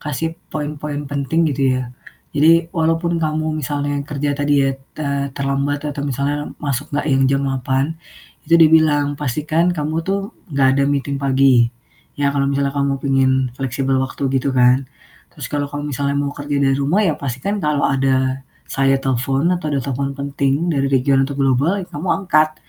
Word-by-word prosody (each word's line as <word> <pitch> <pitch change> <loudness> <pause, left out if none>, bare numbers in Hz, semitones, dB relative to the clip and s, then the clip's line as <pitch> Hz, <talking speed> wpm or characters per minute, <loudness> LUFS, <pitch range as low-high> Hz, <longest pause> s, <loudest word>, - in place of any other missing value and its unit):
kasih 155 +3 -3 0.2
poin-poin 150 -1 -4
penting 145 +4 0
gitu 135 -4 +1
ya. 125 -1 -5 0.4
Jadi, 165 +3 +4
walaupun 165 +1 0
kamu 155 0 -1
misalnya 145 -1 -2
kerja 145 -1 -2
tadi 145 -1 +2
ya, 135 - +2 0.3
te 140 -2 -2
terlambat 140 +1 -1
atau 145 -1 -4
misalnya 140 +2 -1 0.2
masuk 145 0 -3
enggak 145 - -1
yang 135 0 +3
jam 135 0 +1
8:00, 135 0 0 0.6
itu 165 - +5
dibilang 155 -3 +4
"Pastikan 155 +5 0
kamu 150 0 -2
tuh 195 +1 -2 0.2
enggak 140 -4 +2
ada - - +3
meeting 140 0 -1
pagi." 130 -3 +4 0.5
"Ya, 140 -1 +1
kalau 140 -1 +1
misalnya 140 0 0
kamu 140 -1 0
pingin 135 -1 +2 0.3
fleksibel 135 0 -1
waktu," 130 +1 -3 0.2
gitu 130 0 -2
kan. 125 +1 +4 0.5
"Terus - - -6
kalau 145 -1 -1 0.2
misalnya 140 0 -1
mau 140 0 -1
kerja 145 0 -4
dari 135 -1 +3
rumah 150 +10 +2
ya, 175 - +2
pastikan 140 - -3
kalau 150 -3 0
ada 130 -1 +1 0.2
saya 135 0 +1
telepon 135 +5 0
atau 175 -4 -2
ada 145 -2 0
telepon 140 +1 -2
penting 140 +3 0
dari 140 -2 +1
region 135 0 +2
atau 140 - -5
global 140 +8 +1
ya - - -9
kamu 155 +5 -5 0.2
angkat 155 -3 +3
140 Hz, 165 wpm, -19 LUFS, 135-150 Hz, 0.6 s, itu